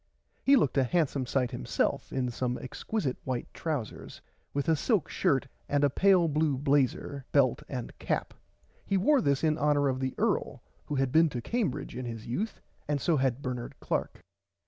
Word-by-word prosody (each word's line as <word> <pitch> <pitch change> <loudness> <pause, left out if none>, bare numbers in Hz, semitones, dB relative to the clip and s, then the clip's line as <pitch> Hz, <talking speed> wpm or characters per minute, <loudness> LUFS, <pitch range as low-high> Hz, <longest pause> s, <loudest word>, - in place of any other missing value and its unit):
He 275 - +6
looked 145 - +3
a - - +4
handsome 140 -2 0
sight 125 -1 0
himself 60 - -1
in 125 -2 -1
some 125 +1 -2
exquisite 135 - -3
white 130 -2 -3
trousers 145 -10 -4 0.3
with 140 +2 -2
a 160 - +4
silk 200 - +1
shirt 140 -8 +1 0.2
and 145 0 +2
a 145 - +4
pale 185 +1 +4
blue 150 -2 +1
blazer 140 0 +1
belt 130 -4 +3
and 125 -3 -5
cap. - - -2 0.5
He 195 - +1
wore 270 +8 +4
this 140 -6 +1
in 155 -1 +2
honour 145 -1 +3
of 130 0 -1
the 130 -1 -2
earl - - 0 0.2
who 145 - -2
had 135 -2 +1
been 160 +2 +5
to 125 - -4
Cambridge 160 - -2
in 125 0 -4
his 115 -2 -6
youth 200 - -3 0.3
and 145 -1 0
so 165 +2 +2
had 135 0 0
Bernard 125 -2 -4
Clark. - - -2
140 Hz, 180 wpm, -29 LUFS, 130-160 Hz, 0.5 s, He